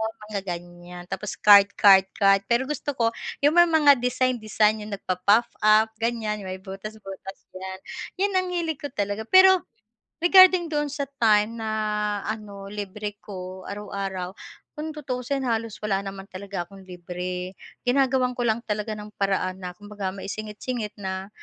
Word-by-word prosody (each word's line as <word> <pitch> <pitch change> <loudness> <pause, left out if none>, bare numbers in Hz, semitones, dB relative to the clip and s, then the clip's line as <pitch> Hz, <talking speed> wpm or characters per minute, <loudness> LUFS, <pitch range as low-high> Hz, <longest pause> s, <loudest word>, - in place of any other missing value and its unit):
oo, 220 0 -1 0.2
mga 200 - -1 0.2
ganiyan. 175 0 -11
Tapos 210 - -4
card 200 0 +7
card 195 -1 +7
card, 195 -2 +5
pero 235 +2 +2
gusto 290 0 -4
ko 230 -1 +2 0.3
'yung 290 - +6
may 345 0 +6
mga 295 -5 +5
design 250 0 0
design, 215 0 +2
'yung 210 -1 -5
nagpa-puff-up, 215 +3 +2
ganiyan, 225 -2 -1
may 185 -1 -5
butas 195 +3 -8
butas 195 0 -8 0.2
'yan, 190 0 -7 0.4
'yan 400 +2 +1
ang 370 - -4
hilig 335 -4 -2
ko 285 - -4
talaga. 205 -2 -3
Pero, 375 0 +7 0.6
regarding 365 -2 +7
doon 295 -1 0
sa 285 0 -3 0.2
time 220 0 +3
na 220 -1 -3 0.5
ano, 205 -2 -6
libre 205 0 -6
ko 185 -1 -8
araw-araw, 195 -3 -5 0.4
kung 310 +1 -4
tutuusin, 270 -2 -3
halos 230 -3 -1
wala 195 -2 +1
naman 195 0 -7
talaga 195 -2 -5
akong 195 +2 -15
libre, 180 0 -5 0.3
ginagawan 255 0 +2
ko - - -5
lang 225 0 +1
talaga 210 0 -3
ng 210 0 -9
paraan 190 -1 0
na 180 -1 -6
kumbaga 205 -1 -6
maisingit 210 +2 -6
singit 235 -5 -3
na 190 -1 -5
210 Hz, 155 wpm, -25 LUFS, 195-250 Hz, 0.6 s, card